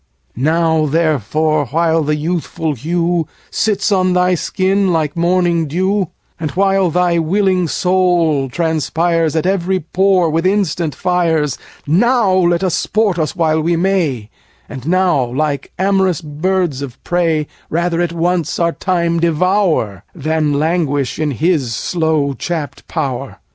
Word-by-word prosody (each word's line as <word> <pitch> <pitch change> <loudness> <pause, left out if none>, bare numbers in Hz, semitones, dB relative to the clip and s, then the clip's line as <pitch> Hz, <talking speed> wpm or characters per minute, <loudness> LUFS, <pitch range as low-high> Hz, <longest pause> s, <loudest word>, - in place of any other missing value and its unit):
Now 160 +3 +1
therefore, 155 -1 +1
while 165 +4 +1
the 150 0 0
youthful 160 0 -2
hue 170 +4 -1 0.2
Sits 210 -1 0
on 185 -2 +2
thy 180 0 +2
skin 190 +2 0
like 155 -3 0
morning 170 -1 +1
dew, 190 +4 0 0.3
And 160 -2 -2
while 195 0 +2
thy 175 0 +1
willing 185 +1 +1
soul 175 -6 +1
transpires 165 +2 0
35 - - -7
At 190 - +3
every 190 0 -1
pore 185 0 +2
with 165 +2 0
instant 175 -6 0
fires, 165 -5 0 0.3
Now 215 - +3
let 175 -1 +2
us 185 -3 0
sport 205 -4 0
us 155 -2 -1
while 160 -2 +1
we 170 +2 +1
may, 165 - 0 0.4
And 135 0 -8
now, 180 -5 +2
like 140 +3 -2
amorous 190 -3 +1
birds 160 -1 -1
of 135 -4 -7
prey, 165 -3 0 0.2
Rather 170 +1 0
at 175 -1 0
once 170 -1 -1
our 170 -1 +1
time 170 -2 0
devour 170 - +1
Than 155 -1 0
languish 150 -4 0
in 155 -1 0
his 145 -4 0
slow 160 -3 0
chapt 160 0 -5
power. - - -3
170 Hz, 140 wpm, -16 LUFS, 155-180 Hz, 0.4 s, At